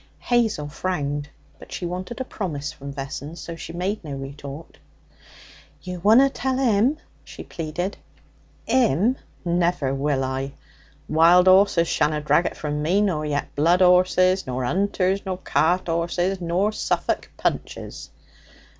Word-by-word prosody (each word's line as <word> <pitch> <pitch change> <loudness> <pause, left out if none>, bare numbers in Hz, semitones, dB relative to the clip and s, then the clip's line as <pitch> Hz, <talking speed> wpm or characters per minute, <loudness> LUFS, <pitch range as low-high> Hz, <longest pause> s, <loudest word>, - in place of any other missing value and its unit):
Hazel 225 -11 0
frowned; 145 -3 -3 0.3
but - - -14
she 180 - -4
wanted 180 +7 -5
a - - -1
promise 150 - -4
from 140 0 -9
Vessons, 140 +4 -6
so 170 - -7
she 165 - -8
made 185 +5 -3
no 150 -3 -6
retort. 140 - -8 1.0
'You 180 -1 -6
wunna 220 +9 +6
tell 260 -1 -1
'im?' 250 +2 +2 0.3
she - - -10
pleaded. 175 +4 -4 0.7
''Im? 230 - +3 0.3
Never 170 -5 +1
will 135 0 0
I! 135 +1 -3 0.5
Wild 170 +3 +5
'orses 185 -3 +5
shanna 150 -1 +1
drag 150 +3 +2
it - - -6
from 150 -1 -3
me, 175 +6 +2
nor 160 -7 0
yet 145 -1 -2
blood 170 +5 +4
'orses, 185 0 +4
nor 130 0 -2
'unters, 190 +4 0
nor 190 -2 -3
cart 180 0 +1
'orses, 175 +3 -1
nor 180 +5 +1
Suffolk - - -1
punches!' - - -3
175 Hz, 135 wpm, -23 LUFS, 150-190 Hz, 1.0 s, wunna